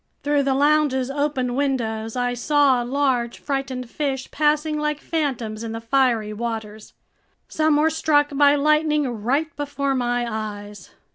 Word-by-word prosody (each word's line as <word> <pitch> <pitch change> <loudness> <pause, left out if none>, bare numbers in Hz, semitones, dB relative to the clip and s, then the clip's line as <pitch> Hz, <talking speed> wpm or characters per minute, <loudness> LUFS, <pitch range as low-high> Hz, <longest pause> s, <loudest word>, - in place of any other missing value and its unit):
Through 290 0 +2
the 270 -1 +1
lounge's 285 -2 +2
open 280 -3 -1
windows, 230 -5 -2
I 245 0 0
saw 275 0 +3
large, 250 -2 0
frightened 270 -3 -4
fish 270 +1 -3
passing 300 0 +1
like 300 0 -1
phantoms 245 -10 -3
in 225 -1 -5
the 225 - -4
fiery 230 -3 +1
waters. 220 -1 -6 0.5
Some 310 -1 +2
were 315 +2 +3
struck 290 -2 +1
by 285 0 +5
lightning 300 0 +2
right 280 +8 -1
before 285 -1 -2
my 245 -1 0
eyes! 210 -3 -6
270 Hz, 140 wpm, -22 LUFS, 235-295 Hz, 0.5 s, by